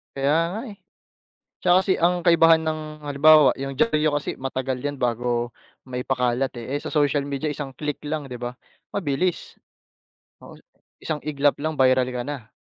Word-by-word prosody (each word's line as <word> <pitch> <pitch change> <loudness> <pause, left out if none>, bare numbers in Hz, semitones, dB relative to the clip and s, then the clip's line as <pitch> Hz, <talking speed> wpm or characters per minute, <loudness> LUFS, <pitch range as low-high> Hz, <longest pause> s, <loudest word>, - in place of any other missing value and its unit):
Kaya 140 +2 +2 0.2
nga, 215 +4 -4
eh. 210 - -9 0.9
Tsaka 180 +1 +5
kasi 190 - +3
ang 175 +2 +4
kaibahan 165 -1 +6
ng 155 0 -1 0.3
halimbawa 150 +1 +6
'yung 135 0 -5
diyaryo 155 -6 +2
kasi 145 - -4
matagal 130 0 -3
'yan 145 0 -3
bago 120 -1 -1 0.3
maipakalat, 125 0 -1
eh. 125 +4 -5
Eh, - - -1
sa - - -5
social 145 -2 +2
media 140 +1 -3
isang 145 -2 -6
click 150 +1 -4
lang, 150 -1 -3
di 125 - -7
ba, 120 0 -5 0.4
mabilis. 175 -1 -2 0.9
Oo, - - -12 0.5
isang 155 -2 -2
iglap 145 -1 +1
lang, 155 +2 -2
viral 130 -1 +4
ka 125 - -2
na. 130 -5 -7
140 Hz, 160 wpm, -23 LUFS, 130-155 Hz, 0.9 s, kaibahan